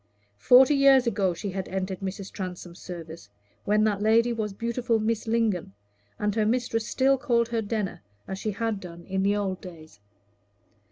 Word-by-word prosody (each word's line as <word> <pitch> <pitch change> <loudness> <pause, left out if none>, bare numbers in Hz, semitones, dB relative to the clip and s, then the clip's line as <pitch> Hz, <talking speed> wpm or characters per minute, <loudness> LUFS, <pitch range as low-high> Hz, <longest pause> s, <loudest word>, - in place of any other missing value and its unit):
Forty 255 - +6
years 275 -2 +5
ago 195 -6 0
she 200 +3 -5
had 190 0 -4
entered 190 0 -3
Mrs. 195 0 -6
Transome's 180 -2 -7
service, 165 - -9 0.4
when 210 +1 +3
that 205 -2 +1
lady 230 +2 +3
was 215 -2 -3
beautiful 235 +2 -1
Miss 220 +1 -1
Lingon, 220 - 0 0.4
and 210 0 -1
her 215 0 +1
mistress 225 0 0
still 270 0 +2
called 235 -2 +1
her 230 -1 -1
Denner, 210 -3 -3 0.3
as 190 0 -5
she 215 - -2
had 215 0 -2
done 170 -2 -10
in 190 0 -2
the 200 +1 +2
old 195 -2 -2
days. 160 - -12
210 Hz, 170 wpm, -26 LUFS, 190-230 Hz, 0.4 s, Forty